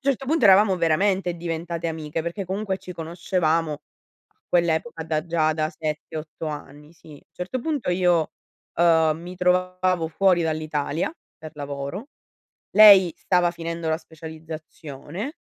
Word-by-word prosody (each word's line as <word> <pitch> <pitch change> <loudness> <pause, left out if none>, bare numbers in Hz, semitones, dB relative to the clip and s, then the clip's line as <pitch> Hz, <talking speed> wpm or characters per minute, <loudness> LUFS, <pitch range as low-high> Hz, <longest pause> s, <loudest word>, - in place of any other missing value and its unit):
Certo 270 -1 -1
punto 315 -1 +1
eravamo 195 0 +6
veramente 180 +2 +1
diventate 170 0 -4
amiche, 160 0 -4
perché 170 +4 -4
comunque 190 +1 -2
ci 180 - -9
conoscevamo 165 -1 -1
a 145 - -17
quell'epoca 170 +2 0
da 155 -1 -1
già 165 -2 +1
da 155 0 -1
7, 155 -1 -5
8 155 +1 -6
anni, 150 +1 -8
sì. 155 -3 -15
Certo 190 +8 -4
punto 295 - -2
io, 175 -3 +2 0.4
ehm, 160 -2 +3
mi 175 +2 -9
trovavo 180 -1 +1
fuori 180 +1 +3
dall'Italia, 155 - -2 0.3
per 155 -1 -10
lavoro, 145 - -6 0.6
lei 200 -4 +8
stava 180 -2 +2
finendo 165 -1 -5
la 160 - +1
specializzazione 160 - -8
170 Hz, 130 wpm, -24 LUFS, 155-185 Hz, 0.6 s, lei